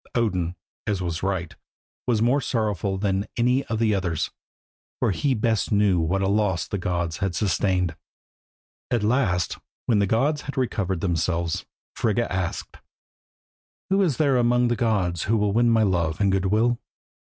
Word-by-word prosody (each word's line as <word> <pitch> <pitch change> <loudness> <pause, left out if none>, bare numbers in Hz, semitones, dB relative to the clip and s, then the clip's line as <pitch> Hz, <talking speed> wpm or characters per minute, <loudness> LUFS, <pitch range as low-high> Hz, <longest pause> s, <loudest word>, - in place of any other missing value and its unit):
Odin, 90 -7 0 0.3
as 100 -3 0
was 85 -3 -3
right, 95 -3 -2 0.5
was 115 -3 +2
more 130 +4 +3
sorrowful 105 -6 -1
than 95 0 0
any 125 +3 +2
of 115 - -2
the 110 -1 +2
others, 90 -5 -1 0.7
for - - +2
he 135 +7 +1
best 110 -1 0
knew 100 -4 +3
what 90 +4 0
a - - +2
loss 100 -4 +1
the 100 - -3
gods 85 -3 -2
had 100 -3 -2
sustained. 90 -2 +1 0.9
At 120 -4 0
last 105 - +1 0.3
when 110 -4 +3
the 100 - +2
gods 140 +8 +1
had 140 -1 -7
recovered 100 -8 -1
themselves, 85 -2 -1 0.3
Frigga 115 -1 0
asked 90 -2 -3 1.1
"Who 195 +1 +4
is 165 -10 +1
there 140 -4 +3
among 120 0 +3
the 120 - +1
gods 100 -8 0
who 115 +2 +2
will 105 -1 +1
win 120 +2 +4
my 115 -1 +4
love 85 -5 0
and 100 -1 +3
good 95 0 +1
will? 115 +4 +2
100 Hz, 165 wpm, -24 LUFS, 90-115 Hz, 1.1 s, Who